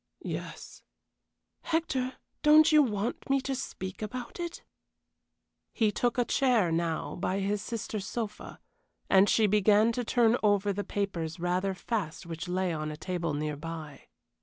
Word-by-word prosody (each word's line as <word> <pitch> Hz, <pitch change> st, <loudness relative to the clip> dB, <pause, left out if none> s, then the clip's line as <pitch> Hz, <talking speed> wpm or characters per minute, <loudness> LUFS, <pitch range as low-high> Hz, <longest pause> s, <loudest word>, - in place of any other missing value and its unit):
"Yes." -, -, -6 dB, 0.8 s
"Hector, 265 Hz, -6 st, -1 dB, 0.3 s
don't 310 Hz, +1 st, +7 dB
you 305 Hz, -1 st, +7 dB
want 225 Hz, -2 st, -2 dB
me 275 Hz, 0 st, +4 dB
to 270 Hz, 0 st, -2 dB
speak 190 Hz, -7 st, -6 dB
about 245 Hz, +7 st, -6 dB
it?" 345 Hz, -1 st, -5 dB, 1.1 s
He 220 Hz, -3 st, +3 dB
took 240 Hz, +4 st, 0 dB
a 245 Hz, -, +3 dB
chair 235 Hz, -11 st, +2 dB
now 165 Hz, 0 st, -1 dB
by 185 Hz, +2 st, -1 dB
his 200 Hz, +1 st, -1 dB
sister's 215 Hz, -3 st, -4 dB
sofa, 220 Hz, -3 st, -5 dB, 0.5 s
and 195 Hz, +1 st, +6 dB
he 220 Hz, -, +4 dB
began 210 Hz, +2 st, +4 dB
to 245 Hz, +1 st, -2 dB
turn 235 Hz, 0 st, +3 dB
over 205 Hz, -1 st, +2 dB
the 205 Hz, +1 st, -3 dB
papers 175 Hz, -6 st, -3 dB
rather 180 Hz, +2 st, 0 dB
fast 190 Hz, -5 st, -3 dB
which 165 Hz, +1 st, -6 dB
lay 180 Hz, 0 st, 0 dB
on 155 Hz, -1 st, -3 dB
a 150 Hz, -, -6 dB
table 170 Hz, -3 st, -2 dB
near 150 Hz, 0 st, -2 dB
by. 155 Hz, -2 st, -8 dB
205 Hz, 150 wpm, -29 LUFS, 175-240 Hz, 1.1 s, don't